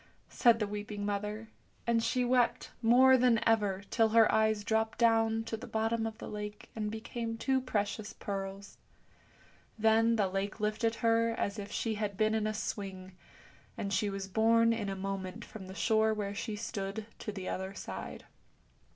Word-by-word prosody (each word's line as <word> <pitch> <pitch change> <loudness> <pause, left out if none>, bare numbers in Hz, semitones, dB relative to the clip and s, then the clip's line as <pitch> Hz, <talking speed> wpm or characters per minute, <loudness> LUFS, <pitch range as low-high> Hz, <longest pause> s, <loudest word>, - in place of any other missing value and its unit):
said 235 -2 +4
the 215 - 0
weeping 205 0 -5
mother, 210 +2 -3 0.4
and 235 -1 +2
she 250 +2 +1
wept 245 -1 +1
more 255 +3 +6
than 245 -2 +4
ever, 205 -4 +2
till 225 -1 +3
her 225 0 +5
eyes 220 -1 +2
dropped 220 +1 0
down 225 -1 +3
to 225 - -4
the 220 - -8
bottom 225 +1 0
of 220 -1 -7
the - - -8
lake 210 0 -7
and 215 -1 -2
became 225 +1 -4
two 265 +2 +1
precious 210 -3 -2
pearls. 195 0 -6 1.0
Then 225 +1 +4
the 205 -3 +2
lake 195 +3 -3
lifted 215 +2 0
her 230 0 +3
as 200 +2 -2
if 205 0 -7
she 225 - -1
had 210 -2 -3
been 215 +1 +2
in 220 -1 +1
a 215 - -1
swing, 190 -3 -5 0.6
and 200 -1 -3
she 205 +2 +1
was 195 -1 -4
borne 230 +3 +4
in 215 -3 -3
a 195 - -3
moment 195 +2 -5
from 195 -4 -10
the 190 - -9
shore 220 0 +2
where 200 -1 -3
she 215 +1 -4
stood 205 -1 -4
to 210 - -4
the 190 -2 -6
other 190 +1 -4
side. - - -7
220 Hz, 175 wpm, -32 LUFS, 200-225 Hz, 1.0 s, more